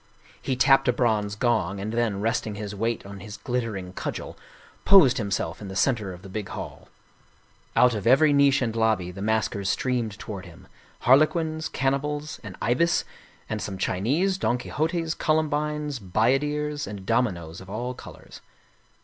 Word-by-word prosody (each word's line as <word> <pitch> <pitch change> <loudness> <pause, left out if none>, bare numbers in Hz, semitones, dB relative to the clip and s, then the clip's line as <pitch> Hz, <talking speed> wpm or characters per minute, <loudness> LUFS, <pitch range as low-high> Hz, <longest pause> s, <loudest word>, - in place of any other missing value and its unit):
He 130 - -1
tapped 135 +1 +4
a - - +6
bronze 110 -4 0
gong, 105 -4 0
and 105 +3 -4
then, 115 -4 0
resting 110 -1 -1
his 105 0 -5
weight 115 +2 -2
on 100 0 -9
his 105 +2 -9
glittering 110 -7 -3
cudgel, - - -5 0.5
posed 180 -12 +6
himself 100 -1 -2
in 100 - -6
the 95 - -7
center 105 -1 +1
of 90 +1 -11
the - - -9
big 95 0 -5
hall. - - -7 0.9
Out 125 -1 +5
of 105 0 -3
every 145 +4 +6
niche 140 -1 +4
and 115 -2 -2
lobby 110 -6 +1
the 95 +2 -9
maskers 100 -2 0
streamed 120 -5 -1
toward 100 -3 -7
him - - -15 0.3
harlequins, 155 +4 +3
cannibals, 145 +3 -2
an 100 -4 -8
ibis, 130 +10 +2 0.4
and 110 -1 -3
some 95 -1 -4
Chi 95 -1 -1
nese, 180 - +1
Don 120 - +1
Quixotes, 160 +5 -1
Columbines, 150 -2 0
bayaderes 145 +9 0
and 100 -1 -7
dominoes 95 -8 -1
of 95 - -12
all 120 +5 -3
colors. - - -12
115 Hz, 160 wpm, -25 LUFS, 100-140 Hz, 0.9 s, a